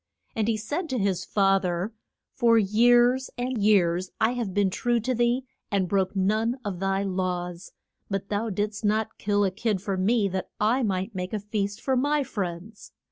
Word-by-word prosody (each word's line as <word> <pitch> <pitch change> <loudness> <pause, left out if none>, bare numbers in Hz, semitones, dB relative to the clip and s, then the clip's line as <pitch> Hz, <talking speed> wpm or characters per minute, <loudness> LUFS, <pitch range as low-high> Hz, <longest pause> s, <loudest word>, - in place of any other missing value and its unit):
And 220 -1 0
he 225 -1 +1
said 295 - -3
to 260 - -1
his 195 -4 0
fa 195 0 +3
ther, 180 +4 -2 0.4
For 235 -3 +4
years 240 +5 +4
and 245 -2 -2
years 185 -3 +3
have 240 +3 +1
I - - -7
been 200 0 +1
true 240 +4 +1
to 255 +3 -1
thee 240 +2 +1 0.2
and 195 -2 +1
broke 190 +1 0
none 215 +6 +1
of 190 -4 -3
thy 195 +1 0
laws. 180 -2 -3 0.4
But 195 -1 -3
thou 215 +2 -1
didst 210 +2 -3
not 220 +1 0
kill 205 0 +1
a 190 - 0
kid 210 +1 -1
for 195 0 -3
me 205 +3 +2
that 190 0 -4
I 225 +5 +2
might 195 -1 -1
make 180 0 -4
a 215 - 0
feast 205 0 -3
for 265 - 0
my 290 +3 +2
friends. 200 -2 -6
205 Hz, 190 wpm, -26 LUFS, 190-230 Hz, 0.4 s, For